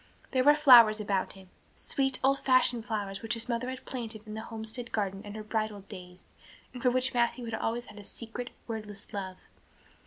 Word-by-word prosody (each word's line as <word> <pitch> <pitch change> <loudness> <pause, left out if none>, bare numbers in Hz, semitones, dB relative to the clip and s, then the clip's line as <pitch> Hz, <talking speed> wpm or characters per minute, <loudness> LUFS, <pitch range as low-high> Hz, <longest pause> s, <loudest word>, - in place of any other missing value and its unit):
There 255 -1 +2
were 295 +2 +7
flowers 240 -7 +8
about 200 -2 -1
him 190 -1 -16 0.2
sweet 270 -1 -1
old 275 +1 +3
fashioned 250 -3 +3
flowers 200 -3 -3
which 230 +1 -1
his 230 +1 -3
mother 245 +1 -2
had 260 0 -7
planted 225 -4 -6
in 215 - -8
the 220 - -5
homestead 225 +2 -4
garden 195 -2 -2
in 205 0 -8
her 215 - -6
bridal 215 -1 -2
days 180 -2 -12 0.5
and 250 - -8
for 250 - +4
which 255 +1 +1
Matthew 240 0 +1
had 225 - -6
always 230 +2 -2
had 210 - -12
a - - -10
secret, 235 +4 -6 0.2
wordless 210 -3 -7
love. 190 -2 -5
225 Hz, 195 wpm, -30 LUFS, 210-245 Hz, 0.5 s, flowers